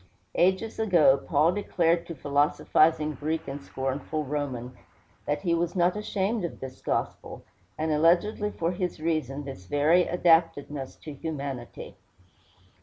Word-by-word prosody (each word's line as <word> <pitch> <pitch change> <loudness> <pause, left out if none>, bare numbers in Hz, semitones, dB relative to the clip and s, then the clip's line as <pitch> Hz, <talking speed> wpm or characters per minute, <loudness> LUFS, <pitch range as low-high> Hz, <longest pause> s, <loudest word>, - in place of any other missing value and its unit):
Ages 190 +6 +1
ago, 175 -11 +5
Paul 150 +3 +2
declared 175 -4 0
to 170 - -6
philosophizing 150 +2 +2
Greek 155 +3 -3
and 140 +1 -5
scornful 140 +3 -3
Roman 130 -4 -4 0.5
that 145 +1 0
he 170 -3 +1
was 170 +1 0
not 180 +1 +3
ashamed 210 0 -1
of 170 - -5
this 130 -1 -8
gospel, - - -3 0.3
and 155 0 -1
alleged 170 +8 +3
for 165 +1 0
his 180 -2 -3
reason 155 -3 -2
this 135 -10 -9
very 155 - +3
adaptedness 165 -5 +1
to 155 - -7
humanity. 140 -5 -6
155 Hz, 130 wpm, -27 LUFS, 140-175 Hz, 0.5 s, ago